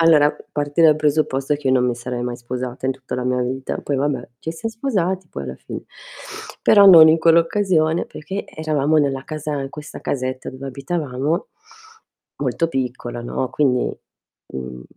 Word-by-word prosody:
Allora, 155 -3 +5 0.2
parti 145 +2 0
dal 155 -2 +7
presupposto 150 -2 +1
che 145 -2 -3
io 130 - +4
non 125 -1 +3
mi 120 - 0
sarei 120 0 -5
mai 120 0 -3
sposata 125 +1 -6
in 130 - +2
tutta 130 -1 -7
la 125 0 -3
mia 125 0 +1
vita, 130 +2 -3
poi 140 - -2
vabbè, 135 -3 -1
ci 160 - -4
siam 225 +7 -4
sposati 190 -7 -1
poi 70 - -6
alla 65 0 -6
fine, - - -8 0.8
però 205 -2 +7
non 165 -4 +10
in 160 - +6
quell'occasione 165 0 +3
perché 190 +7 -6
eravamo 155 -1 +1
nella 135 -2 0
casa 150 -1 -4
in 135 0 -5
questa 150 +1 -9
casetta 130 -1 -3
dove 135 +1 -8
abitavamo, 140 +1 -2 0.9
molto 165 - 0
piccola, 125 -4 -3
no, 125 +2 -2
quindi, 130 -4 +1 0.6
mhmm, 65 -1 -6
145 Hz, 170 wpm, -21 LUFS, 130-160 Hz, 0.9 s, non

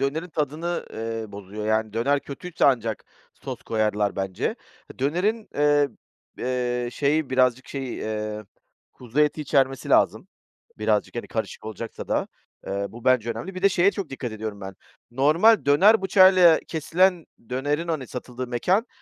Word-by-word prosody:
dönerin 155 +6 -1
tadını, 160 +3 -3
ııı, 115 -2 -5
bozuyor, 100 +2 -7
yani, 110 -1 0
döner 140 +5 +1
kötüyse 170 +5 -4
ancak 115 -6 +1 0.3
sos - - -8
koyarlar, 105 -2 0
bence. 95 -1 -2 0.4
Dönerin, 185 - 0
eee, 145 -1 +3 0.5
eee, 125 -1 -1
şeyi 145 0 0
birazcık 130 -1 +2
şeyi, 135 -3 -5
eee, 105 0 -4 0.5
kuzu 125 +4 -3
eti 150 +1 +2
içermesi 135 -2 +1
lazım - - +2 0.5
birazcık, 105 +1 0
hani, 120 - -4
karışık 110 -1 -5
olacaksa 110 +1 -7
da. - - 0 0.4
Iıı, 100 +1 -3
bu 120 0 -11
bence 125 -3 +3
önemli. 120 +12 -6
Bir 185 - -7
de 200 - +6
şeye 185 +1 +3
çok 200 -6 -5
dikkat 125 -4 -5
ediyorum 110 -1 -6
ben; 95 0 -7 0.4
normal 155 - +4
döner 195 +10 +5
bıçağıyla 185 -3 +6
kesilen 170 +2 +1 0.2
dönerin, 145 +6 -1
hani 155 -6 -2
satıldığı 125 0 -6
mekân, 180 - +1
130 Hz, 145 wpm, -24 LUFS, 110-160 Hz, 0.5 s, de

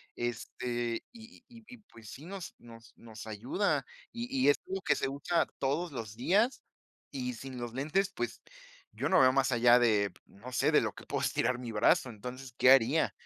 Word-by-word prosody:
este, 120 0 -3
y 230 +1 -15
y 240 - -16
y - - -21
y, - - -17
pues, 110 -2 -13
sí 140 +6 -10
nos 190 0 -8
nos 115 -1 -15
nos 115 -1 -11
ayuda, 120 - -1 0.3
y 235 0 -4
y 260 - +4
es 145 - +3
algo 190 0 -3
que - - +2
se - - -1
usa 155 +4 0
todos 150 +6 -1
los 115 -5 -6
días, 205 - +2 0.5
y 125 -3 -3
sin 130 +2 -8
los 120 -1 -5
lentes, 155 +9 0
pues, - - -4 0.5
yo - - -1
no 185 - +5
veo 130 0 +6
más 135 0 +2
allá 120 0 +6
de, 105 -5 +2
no 120 +6 -12
sé, 125 - +2
de - - +5
lo - - -2
que - - -13
puedo - - -2
estirar 125 +2 +1
mi 120 -2 -6
brazo. 110 +4 +3
Entonces, 125 +3 -8
¿qué 125 - +6
haría? 135 -4 +4
125 Hz, 200 wpm, -31 LUFS, 115-160 Hz, 0.5 s, veo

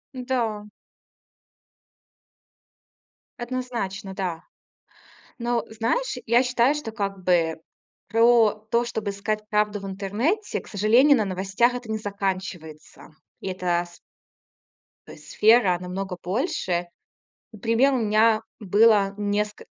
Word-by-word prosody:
М-да. 240 -5 -2 2.7
Однозначно, 235 -6 -4
да. 180 -4 -4 1.0
Но, 240 -1 -1
знаешь, 230 - -1
я 235 +3 +4
считаю, 250 +2 +2
что, 250 -7 -5
как 195 -3 -4
бы, 165 -3 +2 0.5
про 230 0 +5 0.2
то, 235 +1 +2
чтобы 220 -3 -3
искать 210 +1 -3
правду 210 -1 0
в 195 - -7
интернете, 210 - -2
к - - -15
сожалению, 235 +8 +4
на 215 - +1
новостях 195 +6 +1
это 245 -3 -7
не 220 - -1
заканчивается. 190 -7 -5 0.3
И - - -5
эта 180 -2 -1
с 175 - -17 1.1
то - - -11
есть - - -15
сфера 215 -5 +4
намного 180 0 -5
больше. 185 - -2 0.6
Например, 230 +6 +2
у 255 - +1
меня 220 0 +3 0.2
было 205 0 +3
неск 210 0 -2
210 Hz, 110 wpm, -24 LUFS, 190-235 Hz, 2.7 s, про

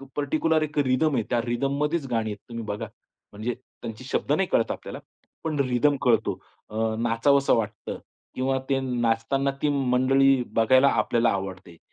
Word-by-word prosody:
Particular 155 +2 +1
एक 150 0 -6
rhythm 140 +2 +2
आहे. 115 - +1
त्या 120 -1 +1
रिदममध्येच 140 +5 -1
गाणी 110 -2 0
आहेत 105 - -6
तुम्ही 115 -1 -5
बघा. 105 0 -4 0.4
म्हणजे 110 +4 -3 0.3
त्यांचे 115 +2 -7
शब्द 135 - -2
नाही 185 +4 +1
कळत 115 - +2
आपल्याला - - -7 0.4
पण 155 -3 -2
रिदम 135 +2 +2
कळतो. 115 -3 +2 0.3
अ, 110 +1 -1
नाचावसं 120 +5 +3
वाटतं 110 -3 -3 0.4
किंवा 130 +1 0
ते 135 -1 +2
नाचताना 125 +2 0
ती 150 - +2
मंडळी 135 0 +3
बघायला 130 +4 +5
आपल्याला 115 +2 +1
आवडते. 95 -3 -5
130 Hz, 150 wpm, -25 LUFS, 115-140 Hz, 0.4 s, बघायला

